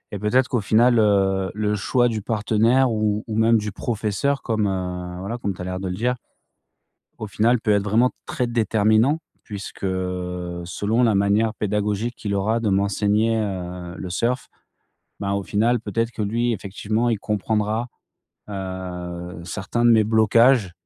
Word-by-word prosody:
et 100 - -4
peut-être 125 +5 +2
qu'au 120 -4 0
final, 115 +3 +4
heu, 95 -2 +2
le 105 0 0
choix 120 +5 +2
du 110 -3 -2
partenaire 115 +4 +2
ou 105 -1 0
ou 110 - -3
même 115 +1 +4
du 105 -2 -3
professeur 115 +6 -1
comme 110 -2 -1 0.6
voilà 105 +6 -4
comme 100 - -1
tu 90 - -10
as - - -4
l'air 90 0 -4
de 95 - -3
le 90 - -3
dire 125 +4 0 1.0
au 110 - -5
final 110 +3 +2
peut 105 - +1
être 100 -1 +2
vraiment 115 +5 +3 0.2
très 125 - -1
déterminant 115 +5 +2 0.2
puisque, 100 -2 -8
selon 90 +3 -2
la 115 -3 +3
manière 105 +3 +2
pédagogique 105 +2 -1
qu'il 100 -2 -3
aura 110 +4 +1
de 110 - 0
m'enseigner, 105 +3 +1
heu, 90 -4 -4
le 90 - -5
surf, 120 +7 -1 0.7
ben, 100 0 -1
au 100 - -1
final, 115 +5 +1
peut-être 115 +2 -2
que 115 - -8
lui, 115 +4 0
effectivement, 110 +3 -2
il 110 -3 +1
comprendra, 105 +2 -1 0.6
heu, 90 -2 -6
certains 100 +7 -3
de 120 - +6
mes 110 -2 +5
blocages 110 -1 +4
105 Hz, 160 wpm, -22 LUFS, 95-115 Hz, 1.0 s, de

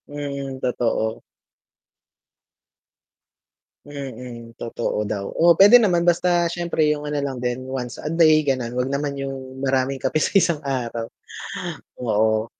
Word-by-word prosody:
Mm, 140 -2 -5
totoo. 115 -2 -1 2.6
Mm, 125 -5 -8
totoo 115 -2 -2
daw, 100 -1 -3
oo, 170 0 +5
puwede 215 +5 +8
naman 175 -5 +2
basta 175 0 +3
siyempre 170 -2 0
'yung 150 -1 +1
ano 150 - -2
lang 135 -3 -3
din 125 +1 -2
once 125 -3 -5
a 155 - -4
day, 155 -2 +5
gano'n, 125 -3 -1
huwag 130 +2 -1
naman 140 0 -2
'yung 135 -1 -6
maraming 135 0 0
kape 155 +3 0
sa - - 0
isang 165 -5 +2
araw, 120 -5 -3 0.9
oo. 110 -1 +1
135 Hz, 130 wpm, -22 LUFS, 125-155 Hz, 2.6 s, puwede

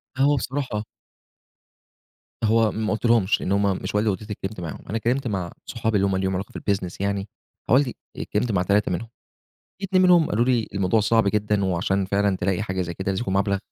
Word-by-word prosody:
فهو 140 +2 +3
بصراحة 130 -5 -2 1.6
هو 110 0 +3
ما 110 0 -1
قلتلهمش، 110 -3 +2
لإن 95 - -2
هم 100 -1 +2
مش - - -4
والدي 105 +1 +2
ووالدتي 100 +2 -2
اللي 105 - -4
اتكلِّمت 95 0 -5
معاهم. 85 -3 -7
أنا 115 - -1
اتكلِّمت 125 +4 0
مع 95 -5 -2
صحابي 110 -2 -2
اللي 100 0 +2
هم 95 -1 0
ليهم 95 0 0
علاقة 95 +2 -4
في - - -7
الbusiness 95 -4 -2
يعني، 100 0 -1 0.4
حوالي 130 +1 +4 0.2
اتكلِّمت 110 +2 -1
مع 95 -3 +2
3 100 +1 +2
منهم. 110 +6 -3 0.7
في - - -5
2 185 -1 +3
منهم 175 -3 +6
قالوا 115 +3 +2
لي: 120 -3 +1
"الموضوع 100 +3 +2
صعب 110 0 +3
جدًا 105 -1 +1
وعشان 95 +2 0
فعلًا 100 0 +1
تلاقي 95 +3 0
حاجة 95 -3 -2
زي 85 -1 -5
كده، 95 +2 -3
لازم 95 - -2
يكون 95 -4 -2
مبلغ 100 0 +1
105 Hz, 200 wpm, -24 LUFS, 95-115 Hz, 1.6 s, منهم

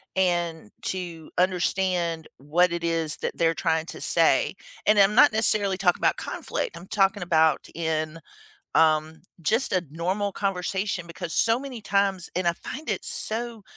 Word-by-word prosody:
and 175 - 0
to 170 -4 -5
understand 180 -2 0
what 170 +6 +2
it 170 0 -3
is 165 -2 0
that - - -4
they're 165 0 +2
trying 160 0 0
to - - -7
say. - - +3 0.3
And 215 - +4
I'm 200 +2 +5
not 290 -1 +7
necessarily 210 -3 +2
talking 180 -3 +2
about - - +2
conflict, - - -4
I'm 185 - -11
talking 195 -1 +1
about 160 -3 +2
in, 160 -1 -2 0.6
um, 155 0 +2 0.2
just 225 - +1
a 185 -2 +1
normal 190 +5 -1
conversation 190 -1 -2
because 170 -1 -7
so 230 +1 +3
many 265 -4 -7
times 195 -3 +1
and 180 0 -1
I - - +3
find 290 - -7
it - - -2
so 230 -1 -2
180 Hz, 155 wpm, -25 LUFS, 165-200 Hz, 0.6 s, not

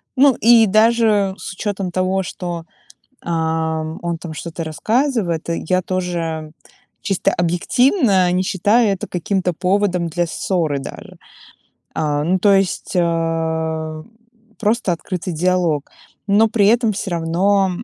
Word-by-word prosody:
ну, 270 -1 +5
и 230 0 +7
даже 215 -2 +3
с - - -7
учётом 195 -2 -3
того, 185 +1 0
что, 175 -2 -5 0.6
ам, 160 -1 -2
он 170 -1 -2
там 160 -1 -8
что-то 165 +1 -6
рассказывает, 215 - -1
я 185 +2 0
тоже 165 -4 -3 0.5
чисто 195 -2 0
объективно 185 - +2
не 185 +1 +1
считаю 205 +4 +2
это 195 - -3
каким-то 180 +1 -1
поводом 180 0 0
для 175 +2 -1
ссоры 160 -4 -1
даже. - - -10 0.8
А, 145 -1 0
ну, 185 +3 +1
то 200 +1 +4
есть, 195 -1 0
а, 160 -2 -1 0.6
просто 220 -3 +1
открытый 180 +1 -4
диалог. 170 -3 0 0.4
Но 210 +3 +4
при 210 -2 +2
этом 230 -1 +3
всё 195 0 -4
равно, 185 +4 +1
180 Hz, 125 wpm, -19 LUFS, 165-200 Hz, 0.8 s, и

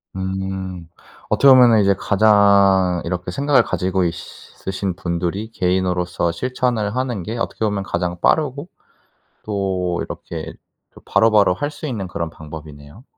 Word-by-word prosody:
음. 95 -2 -4 0.4
어떻게 140 - +5
보면 120 -4 +6
이제 100 0 +4
가장 100 -3 +4
이렇게 90 0 -3
생각을 140 +1 +3
가지고 95 -2 -1
있으신 95 +2 -5
분들이 90 +6 -3
개인으로서 90 -3 0
실천을 120 0 -2
하는 125 -7 -2
게 115 +5 -5
어떻게 115 - -2
보면 100 -2 -1
가장 90 -2 -3
빠르고 145 +1 +1 0.8
또 95 -4 -2
이렇게 - - -7 0.4
또 - - -16
바로바로 105 -3 +3
할 145 +6 -3
수 150 +1 -8
있는 105 -9 -4
그런 85 -2 -4
방법이네요. 75 - -11
95 Hz, 300 characters per minute, -20 LUFS, 90-110 Hz, 0.8 s, 보면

